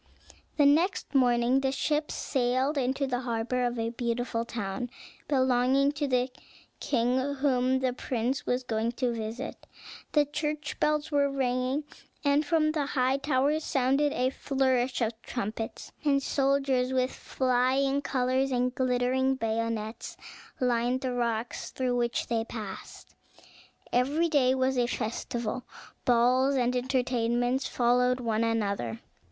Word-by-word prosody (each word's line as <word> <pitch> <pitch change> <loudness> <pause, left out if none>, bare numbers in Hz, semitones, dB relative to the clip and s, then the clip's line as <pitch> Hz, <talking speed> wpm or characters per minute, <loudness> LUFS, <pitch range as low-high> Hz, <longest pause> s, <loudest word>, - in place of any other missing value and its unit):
The 290 - +5
next 320 +4 +2
morning 245 -1 +3
the 270 -1 0
ship 300 +2 0
sailed 260 +2 0
into 270 +1 0
the 250 -2 -1
harbor 245 0 -1
of 245 0 -1
a 230 0 -1
beautiful 235 0 -2
town 220 +1 -4 0.4
belonging 260 0 +3
to 290 0 -2
the 250 -1 +1 0.5
king 260 +2 0
whom 260 -2 +2
the 255 -1 +1
prince 250 +1 -2
was 250 +1 -1
going 230 -1 -1
to 245 -1 -1
visit. 230 +4 -6 0.5
The 295 -1 +4
church 300 +1 -3
bells 300 0 +1
were 285 -1 +3
ringing, 260 +1 0 0.4
and 285 +1 +3
from 310 0 +2
the 300 -3 -1
high 260 -1 +1
towers 285 +2 +1
sounded 275 +2 +2
a 255 +1 +1
flourish 260 -2 0
of 225 0 -1
trumpets; 225 -1 -5
and 280 -2 +2
soldiers, 270 -2 +1
with 255 0 +1
flying 260 +2 +1
colors 260 0 0
and 250 0 +1
glittering 260 +1 +1
bayonets, 225 -1 -3 0.4
lined 245 0 +1
the 255 -1 -2
rocks 235 -1 -2
through 255 -1 -1
which 240 -1 0
they 230 -1 0
passed. 220 -3 -8 0.8
Every 290 +7 +2
day 265 -4 +3
was 260 0 +1
a 240 - +2
festival; 235 +1 -3 0.4
balls 250 +3 +3
and 250 -1 +1
entertainments 245 0 0
followed 250 +1 +2
one 230 -2 0
another. 200 - -1
255 Hz, 135 wpm, -28 LUFS, 240-275 Hz, 0.8 s, The